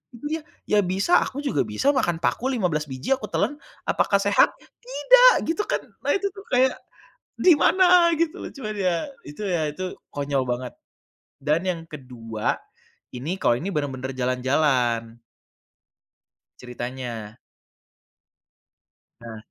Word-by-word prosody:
itu 235 - -11
dia, 320 0 -2 0.3
ya 210 - +3
bisa 190 - +3
aku 275 - -6
juga 275 - +1
bisa 280 +2 +1
makan 175 -10 +1
paku 260 +3 0
15 175 -11 0
biji 130 - 0
aku 265 - -7
telen, 290 - 0 0.3
apakah - - +2
sehat? - - +4 0.3
Tidak, - - +6
gitu 380 +6 0
kan. - - -1 0.2
Nah - - +1
itu 400 +1 0
kan 395 - -10
kayak, 260 +1 +4 0.6
di 355 -3 +6
mana 360 -2 +5
gitu, 335 -2 0 0.2
cuman 215 -6 -5
ya, 180 -3 +1 0.3
itu 150 +8 -8
ya 170 -5 0
itu, 185 +4 -5 0.2
konyol 140 -2 0
banget. 125 0 -3 0.7
Dan 150 +4 +1
yang 175 -2 -1
kedua, 120 -7 -4 0.6
ini 150 +9 -3
kalau 120 - +3
ini 190 - -4
benar-benar 135 -3 -3
jalan-jalan. 125 -3 0 1.4
Ceritanya. 120 -3 -6 1.8
Nah 115 -2 -9
160 Hz, 130 wpm, -24 LUFS, -, 1.8 s, Tidak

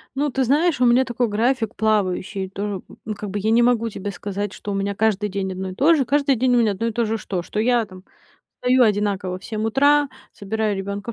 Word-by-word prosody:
Ну, 290 +2 0
ты 265 +1 0
знаешь, 295 +2 +2
у - - +5
меня 245 +2 +4
такой 240 0 -1
график 225 +1 0
плавающий. 195 -2 0
Тоже, 200 +1 -4
м, - - -14
ну, 215 -1 -4
как 205 0 -6
бы 205 +1 -3
я 220 +2 0
не 235 - +5
могу 235 -1 +2
тебе 200 0 -5
сказать, 205 +1 -4
что 205 - -6
у - - -2
меня 200 0 -2
каждый 210 -1 +1
день 190 -1 -3
одно 185 0 -4
и 185 - -8
то 305 - +5
же, 285 -4 +2
каждый 280 +1 +2
день 250 +1 +2
у 240 - +4
меня 220 -3 +3
одно 230 +4 -2
и - - -1
то 235 +1 0
же 220 +1 -1
что? 185 -4 -4
Что 210 - -4
я 240 0 +2
там 185 -2 -14 0.6
встаю 250 0 +4
одинаково 200 -4 0
в - - -18
7 220 0 -3
утра, 285 +5 +3 0.2
собираю 215 +1 -2
ребёнка 200 +3 -5
220 Hz, 250 wpm, -22 LUFS, 200-245 Hz, 0.6 s, у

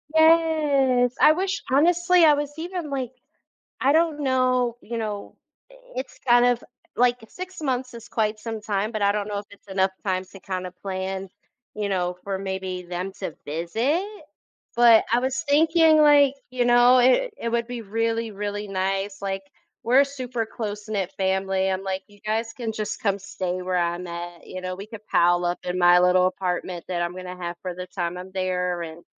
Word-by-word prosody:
Yes. 300 -6 +4
I 310 - +8
wish 380 +3 -2
honestly, 350 +4 +4
I 305 - +7
was 290 0 -2
even 345 -2 -4
like, 260 -3 -3 0.7
I 275 +2 +4
don't 320 -2 +2
know, 255 -2 +1
you 235 +1 -5
know, 210 -2 -5 0.3
i - - -17 0.2
it's 260 +1 -5
kind 240 0 +6
of, 245 -1 +2 0.3
like, 245 +1 +3
6 370 0 -8
months 255 -3 -2
is 230 -1 -10
quite 215 -1 -1
some 225 -1 -5
time, 210 0 -1
but 215 - -3
I 200 0 +4
don't 210 0 -2
know 205 - -2
if 200 - -7
it's 200 0 -18
enough 190 0 +1
time 185 -1 0
to 195 - -12
kinda 185 -1 -5
plan, 190 0 -4 0.5
you 210 -1 -2
know, 180 -2 -1
for 195 -1 -2
maybe 190 -1 -4
them 180 +2 -5
to 185 - -4
visit. 225 - -1 0.7
But 235 -2 +7
I 240 - +4
was 260 +4 -2
thinking, 320 +1 +5
like, 290 -2 +6 0.2
you 250 -1 0
know, 245 +1 +6
it 260 - +4
it 230 - -3
would 235 0 0
be 240 -2 -5
really, 225 +2 -1
really 205 +1 -4
nice, 195 +1 -2
like, 195 -1 -2 0.4
we're 250 +4 +5
a 280 - +5
super 250 -4 -4
close-knit 210 -3 -4
family. 190 0 +1
I'm 190 +1 -2
like, 190 0 -3
you 205 -1 -20
guys 225 +1 -1
can 230 -3 -3
just 210 -1 -4
come 200 -2 +1
stay 185 -1 -4
where 185 0 -1
I'm 175 +1 -1
at. 170 0 -7
You 185 - -7
know, 185 0 -3
we 200 - -8
could 215 -1 -11
pile 175 +1 +3
up 175 0 0
in 180 0 -2
my 175 0 +6
little 180 0 +4
apartment 180 -1 -3
that 175 -2 -1
I'm 175 +1 -3
gonna 185 0 -7
have 175 -1 -5
for 180 -1 -4
the 180 +1 -6
time 175 -1 -3
I'm 185 +1 -9
there, 180 -2 -1
and, 165 +1 -9
210 Hz, 190 wpm, -24 LUFS, 185-255 Hz, 0.7 s, I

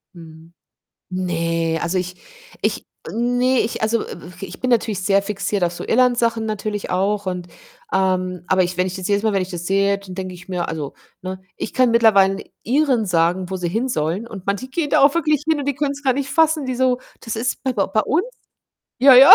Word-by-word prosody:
Mhm. 165 0 -13 0.6
Ne, 165 -2 -1
also, 170 +2 -1
ich 180 0 -4 0.4
ich - - -1 0.2
ne, 245 +2 +2
ich 225 - -2
also, 220 +1 +1
w - - -5 0.3
w - - -4
ich - - -11
bin 255 - -1
natürlich 220 -4 +1
sehr 195 +1 +3
fixiert 200 -2 -1
auf 170 - 0
so - - -7
Irland-Sachen 235 -2 +2
natürlich 210 -1 -3
auch 200 +2 0
und 180 -1 -3 0.5
ähm, 185 -2 0
aber 185 0 +3
ich 180 0 -2
wenn 180 0 +2
ich 185 - -4
das 185 0 -4
jedes 200 0 +2
Mal 220 -2 +2
wenn 195 - +1
ich 185 - -3
das 175 -1 -5
sehe, 200 +1 +2
d 200 - -14
dann 180 - -7
denke 185 -1 -5
ich 180 +1 -13
mir: 180 -2 -2
„Also, 150 -4 -4 0.3
ne, 185 0 -5 0.2
ich - - -5
kann 255 -2 +3
mittlerweile 205 -4 +5
'nen - - -7 0.2
Iren 255 -3 +2
sagen, 180 +1 +1
wo 190 - -3
sie 175 -1 -2
hin 235 +6 -1
sollen 175 +3 -1
und 200 -5 -9
manche 200 +6 -2
gehen 290 +2 -2
da - - +4
auch 280 +2 +6
wirklich 305 -3 +1
hin 315 -2 +3
und 280 - -4
die 285 - +1
können's 280 0 -2
gar 265 -2 +3
nicht 270 +1 -2
fassen.“ 320 -3 +3
Die 255 - -1
so: 255 -1 +2 0.2
„Das 225 -1 -5
ist 245 +3 -2
b 260 - +1
bei 200 -4 +1
bei 215 +2 +1
uns?“ 350 - +1 0.7
Ja, 265 0 +8
ja. 265 +2 +11
200 Hz, 225 wpm, -21 LUFS, 180-250 Hz, 0.7 s, ja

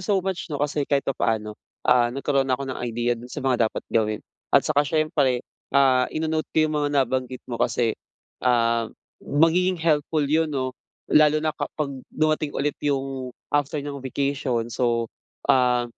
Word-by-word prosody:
so 200 +2 +1
much 190 -3 -3
'no, 150 - -3
kasi 145 0 -1
kahit 140 -1 +2
papaano, 110 -5 -1 0.3
ah, 120 -1 +4
nagkaroon 135 +1 0
na 130 - +2
ako 140 - -5
ng 130 -1 -5
idea 120 0 0
doon 120 +1 -7
sa 140 +2 -6
mga 120 -4 +3
dapat - - -7
gawin. 110 -1 +1 0.3
At - - +4
saka 150 -2 +3
siyempre, 145 -5 +1 0.2
ah, 130 -2 +4
ino-note 155 0 -2
ko 155 - +2
'yung 155 - -1
mga 145 - +1
nabanggit 130 -1 -1
mo 120 -2 -6
kasi, 115 -2 +1 0.5
ah, 115 -2 +2 0.3
magiging 170 +5 +2
helpful 155 -2 +1
'yun 155 +2 +2
'no, 130 -3 -2 0.4
lalo 155 0 +5
na 155 - +1
kapag 150 -2 -4 0.2
dumating 155 -1 0
ulit 145 +1 0
'yung, 135 -2 -2 0.2
after 145 0 +1
ng 140 -1 -5
vacation 135 -2 -1
so, 120 -1 +1 0.5
ah, 125 -2 +3
140 Hz, 165 wpm, -24 LUFS, 125-150 Hz, 0.5 s, lalo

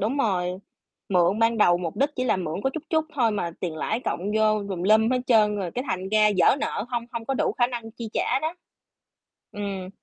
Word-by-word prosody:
đúng 235 +8 -1
rồi, 190 -8 +1 0.6
mượn 180 +1 +3
ban 225 0 +2
đầu 175 -4 +5
mục 170 -3 -4
đích 280 +2 +2
chỉ 255 - -1
là 250 - +2
mượn 175 +1 -4
có 265 - +2
chút 315 - -4
chút 315 -1 +2
thôi 235 -5 +2
mà 200 -5 -2
tiền 165 -3 -3
lãi 220 +8 -2
cộng - - -2 0.2
vô 215 -1 +2
tùm 180 -3 -4
lum 220 +4 +4
hết 255 -1 +1
trơn 210 -3 +4
rồi 185 -4 -3
cái 250 +2 -4
thành 185 +1 -2
ra 215 0 +4
vỡ 255 - +5
nợ 215 - -2
hông 240 -2 -2
hông 235 -1 -4
có 270 - -1
đủ - - 0
khả 240 - +2
năng 235 -2 -6
chi 225 -1 -8
trả - - +1
đó. 320 +3 -2 1.0
Ừm. 195 -2 -5
215 Hz, 235 wpm, -25 LUFS, 190-240 Hz, 1.0 s, đầu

